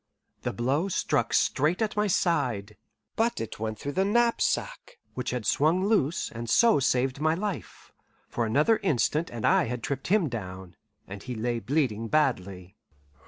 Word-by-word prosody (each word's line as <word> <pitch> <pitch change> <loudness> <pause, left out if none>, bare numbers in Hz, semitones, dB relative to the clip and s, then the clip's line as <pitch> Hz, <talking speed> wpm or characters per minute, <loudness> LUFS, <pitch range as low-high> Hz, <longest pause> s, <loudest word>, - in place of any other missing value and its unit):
The - - -2
blow 135 - 0
struck 195 - 0
straight 155 +6 +2
at 220 -2 -1
my 210 0 +1
side, 125 - 0 0.4
but 230 +1 0
it 115 - -6
went 110 0 -3
through 140 - -5
the 190 +6 +1
knapsack, 240 - 0 0.2
which 125 - -3
had 125 -3 -3
swung 165 - +2
loose, 185 -8 +1
and 115 0 -6
so 230 - +5
saved 130 +1 0
my 160 +1 +2
life; 200 +1 -6 0.4
for 115 -2 -2
another 150 - +3
instant 155 - 0
and 115 -2 -4
I - - +4
had 120 0 -5
tripped 135 -1 -3
him 195 -3 +3
down, 95 - -7 0.3
and 100 +1 -8
he 125 -1 -6
lay 120 +1 -1
bleeding 115 -2 -1
badly. 100 -9 -1
135 Hz, 165 wpm, -27 LUFS, 115-180 Hz, 0.4 s, so